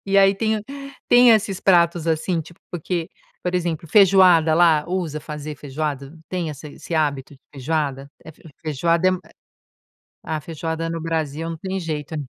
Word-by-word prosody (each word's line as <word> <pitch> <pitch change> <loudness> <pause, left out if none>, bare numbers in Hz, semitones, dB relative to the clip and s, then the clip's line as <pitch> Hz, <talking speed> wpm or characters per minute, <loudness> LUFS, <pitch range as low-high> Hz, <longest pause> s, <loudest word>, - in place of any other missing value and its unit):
E 195 0 +1
aí 195 0 +5
tem 220 +2 0
o 210 - -10 0.4
tem 245 0 +7
esses 200 -3 +2
pratos, 170 -3 +3
assim, 165 +1 0
tipo, 165 +2 -13
porque, 175 0 -3 0.3
por 180 0 -2
exemplo, 170 -2 -2
feijoada 185 -5 +5
lá, 160 -3 +4
usa 170 -5 -3
fazer 150 -1 -7
feijoada, 145 0 -4 0.2
tem 175 -4 -3
essa 150 +1 -9
esse 165 - -8
hábito 145 -3 -1
de 135 - -22
feijoada? 140 -1 -3
É 160 - -10 0.3
feijoada 165 +4 +1
é - - +3 1.1
a 155 -1 -3
feijoada 165 +2 -4
no 165 - -4
Brasil, 160 -1 -3
não 165 - -5
tem 190 +3 -4
jeito. 155 -1 -5
165 Hz, 160 wpm, -22 LUFS, 150-180 Hz, 1.1 s, tem